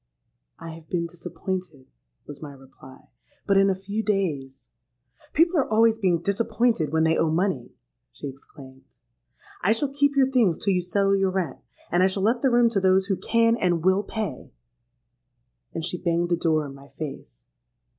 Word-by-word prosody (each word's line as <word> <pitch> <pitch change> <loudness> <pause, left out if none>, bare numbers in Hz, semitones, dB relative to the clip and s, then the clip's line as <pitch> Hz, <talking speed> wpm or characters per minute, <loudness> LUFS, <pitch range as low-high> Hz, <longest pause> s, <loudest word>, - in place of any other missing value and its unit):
'—'I 165 - -8
have 160 -1 -13
been 170 -2 -1
disappointed,' 175 -3 -6 0.4
was 145 - -10
my 145 -2 -8
reply: 135 -1 -16 0.4
'but 200 - +2
in 195 0 +5
a 190 - +1
few 200 +3 -4
days——.'—'People 145 - -2
are 270 - -1
always 225 0 +4
being 180 -5 +2
disappointed 205 - 0
when 160 0 +2
they 160 0 +3
owe 165 - +1
money,' 160 -7 -1 0.4
she - - -8
exclaimed. 135 -1 -13 0.8
'I 205 +5 +3
shall 275 +4 -2
keep 285 0 +2
your 265 -1 +3
things 225 -11 +3
till 200 - 0
you 180 - +1
settle 195 +2 +1
your 195 -1 +2
rent; 185 -2 -3 0.3
and 175 - +3
I 185 - +5
shall 190 0 -2
let 235 +3 +2
the 270 - +3
room 240 -1 +4
to 220 -4 0
those 190 0 +3
who 195 -1 0
can 230 +5 +2
and 175 -6 0
will 190 +1 +4
pay.' 215 0 -5 1.2
And 165 -1 -3
she 180 0 -3
banged 175 -1 0
the 175 - +3
door 160 -3 +1
in 140 - -8
my 140 0 -14
face. 135 - -8
185 Hz, 175 wpm, -25 LUFS, 160-210 Hz, 1.2 s, in